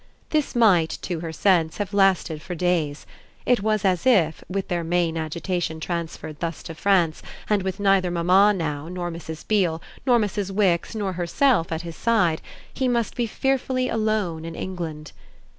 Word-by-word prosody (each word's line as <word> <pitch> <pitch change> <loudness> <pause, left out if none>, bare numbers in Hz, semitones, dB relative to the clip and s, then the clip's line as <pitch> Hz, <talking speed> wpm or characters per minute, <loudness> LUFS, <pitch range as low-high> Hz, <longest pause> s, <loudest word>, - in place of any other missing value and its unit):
This 305 -4 0
might, 190 -9 +5
to 175 -3 -3
her 165 0 -5
sense, 165 -1 +2
have 205 -1 -3
lasted 190 -6 +2
for 180 +1 -6
days; 165 -4 0 0.4
it 245 -4 +3
was 215 -1 0
as 185 +4 +1
if, 175 -11 +3
with 195 +1 -2
their 175 -2 -1
main 170 0 0
agitation 165 +1 -2
transferred 160 -2 -5
thus 165 -1 -4
to 165 - -7
France 175 -2 +2 0.3
and 210 -2 +2
with 190 0 -3
neither 195 -2 +3
mamma 180 +4 +4
now 155 -6 -3
nor 175 0 -4
Mrs. 160 -1 -8
Beale 180 -7 +2 0.2
nor 245 -3 +4
Mrs. 205 -3 -1
Wix 195 0 +1
nor 200 -3 -2
herself 175 +2 +1
at 160 +1 -2
his 170 -1 -7
side, 210 -9 +2 0.3
he 265 - 0
must 235 -3 0
be 240 -2 0
fearfully 260 +1 0
alone 215 -7 -1
in 165 0 -6
England. 160 -5 -5
180 Hz, 170 wpm, -24 LUFS, 165-205 Hz, 0.4 s, might